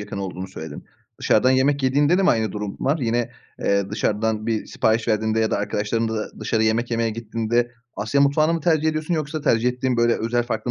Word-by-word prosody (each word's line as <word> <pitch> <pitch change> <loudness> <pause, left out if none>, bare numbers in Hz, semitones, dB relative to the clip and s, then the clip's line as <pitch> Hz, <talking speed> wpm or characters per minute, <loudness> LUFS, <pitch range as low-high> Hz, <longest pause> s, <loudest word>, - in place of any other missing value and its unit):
yakın 105 -1 -6
olduğunu 95 -1 -5
söyledin. 80 -5 -8 0.3
Dışarıdan 130 - +3
yemek 135 +2 +2
yediğinde 145 +7 +3
de - - +2
mi - - +5
aynı 110 -3 0
durum 105 -1 -5
var? 140 +4 +1
Yine, 120 -1 -1 0.3
eee, 100 0 +1
dışarıdan 110 +1 -1
bir 110 -2 -1
sipariş 110 +1 0
verdiğinde 110 0 +1
ya 110 - +1
da - - +1
arkadaşlarınla 110 +2 -1
da 105 - -6
dışarı 110 -1 0
yemek 115 +2 +1
yemeye 115 -1 0
gittiğinde 115 +2 -1 0.2
Asya 110 +7 0
mutfağını 155 +4 +3
mı 165 - -2
tercih 160 -1 +2
ediyorsun 155 +2 -1
yoksa 155 0 -3
tercih 120 -4 +2
ettiğin 125 0 -1
böyle 120 0 +3
özel 120 +2 0
farklı 120 0 -3
115 Hz, 200 wpm, -22 LUFS, 110-135 Hz, 0.3 s, mi